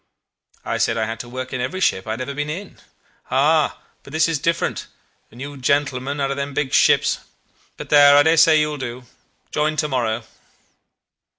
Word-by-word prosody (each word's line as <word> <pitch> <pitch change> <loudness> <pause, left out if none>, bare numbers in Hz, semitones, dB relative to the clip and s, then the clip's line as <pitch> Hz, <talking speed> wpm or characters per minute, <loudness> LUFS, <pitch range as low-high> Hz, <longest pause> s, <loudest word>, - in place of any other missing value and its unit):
I - - -2
said 115 - +1
I 110 - 0
had 115 0 -5
to 120 - -8
work 130 +1 -6
in 130 - -2
every 130 +9 -3
ship 95 - 0
I - - -2
had 115 - -6
ever 140 +2 -4
been 145 +1 -3
in. 185 +6 -7 0.5
'Ah, 150 +3 +2 0.2
but - - -14
this 160 +1 +2
is 165 -3 -1
different, 170 +3 -1 0.4
and 120 - -16
you 145 +2 -7
gentlemen 140 +1 -1
out 135 -1 0
of 140 - -3
them 140 0 -4
big 135 -3 -2
ships;... - - +3 0.6
but - - -8
there! 145 -1 +7
I 145 - +7
dare 160 +2 +4
say 155 -1 +6
you 150 0 +1
will 150 - -5
do. 125 -2 -6 0.5
Join 155 +1 0
to 155 0 0
morrow. 120 -4 -1
140 Hz, 200 wpm, -21 LUFS, 130-150 Hz, 0.6 s, there